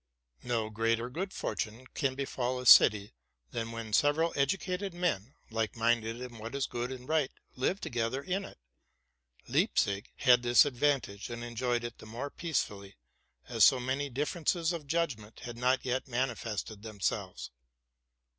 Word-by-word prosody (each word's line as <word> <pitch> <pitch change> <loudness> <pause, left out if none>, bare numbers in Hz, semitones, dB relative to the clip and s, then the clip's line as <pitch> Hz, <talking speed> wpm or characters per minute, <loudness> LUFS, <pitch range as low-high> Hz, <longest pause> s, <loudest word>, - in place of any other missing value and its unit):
No 115 -3 -1
greater 115 +2 0
good 185 +7 -3
fortune 115 - -4
can 135 -2 0
befall 130 -2 -2
a 125 - -6
city, 105 - +7 0.4
than 115 0 -3
when 115 -2 -6
sev 145 +6 +4
eral 165 +1 0
educated 180 +6 -1
men, 150 - -1 0.2
like 110 -2 -1
minded 115 0 +1
in 125 -2 -8
what 115 +5 -6
is 140 -1 0
good 120 +1 -4
and 130 -1 -8
right, 155 -4 +2 0.3
live 155 +10 0
together 120 - -2
in 190 +4 -1
it. - - -11 0.9
Leipzig 100 +3 +1
had 125 -3 +5
this 120 +2 +6
advantage, 130 -6 0
and 120 0 -5
enjoyed 120 0 -1
it 120 -1 -6
the - - -11
more 125 +6 -5
peacefully, 105 - -3 0.5
as 115 -3 +3
so 130 - +7
many 135 +3 -1
differences 160 +5 0
of 155 -4 -6
judgment 140 -10 -2
had 120 -2 -7
not 125 +2 +1
yet 130 +1 -1
manifested 115 -4 -3
themselves. 105 -3 -3
125 Hz, 155 wpm, -31 LUFS, 115-140 Hz, 0.9 s, city